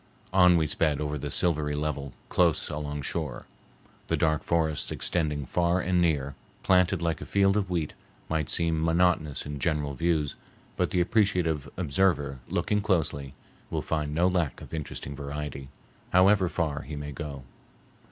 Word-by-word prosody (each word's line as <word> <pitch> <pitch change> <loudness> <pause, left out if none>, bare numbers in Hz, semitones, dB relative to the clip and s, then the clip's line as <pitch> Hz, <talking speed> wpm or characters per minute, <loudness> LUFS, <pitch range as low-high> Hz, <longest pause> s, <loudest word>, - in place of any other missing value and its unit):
On 90 -2 +6
we 80 - +2
sped 75 -1 +1
over 75 -1 -2
the - - -4
silvery 75 -4 +1
level, 75 -2 -3
close 85 -3 +2
alongshore. 75 0 -4 0.6
The - - +1
dark 80 -2 +2
forests 80 -3 0
extending 75 -4 -1
far 85 +6 +1
and 90 0 +1
near, 70 -5 +1 0.3
planted 90 -1 +3
like 80 -3 -1
a - - -5
field 100 0 +3
of 100 -3 0
wheat, 85 -4 -1 0.3
might 80 -3 -1
seem 80 -1 +1
monotonous 80 -3 +2
in 75 -1 -5
general 75 -1 0
views, 80 -1 0 0.4
but - - 0
the 90 - +1
appreciative 90 -5 +1
observer, 75 -5 +1
looking 105 -1 0
closely, 75 -9 -1 0.3
will - - -2
find 75 -2 -1
no 85 +3 +3
lack 90 -7 0
of - - -12
interesting 70 -2 -5
variety, 70 -1 -5 0.4
however 95 0 +5
far 75 -5 -1
he 75 +2 -7
may 75 0 -5
go. 70 -2 -6
80 Hz, 150 wpm, -28 LUFS, 75-90 Hz, 0.6 s, On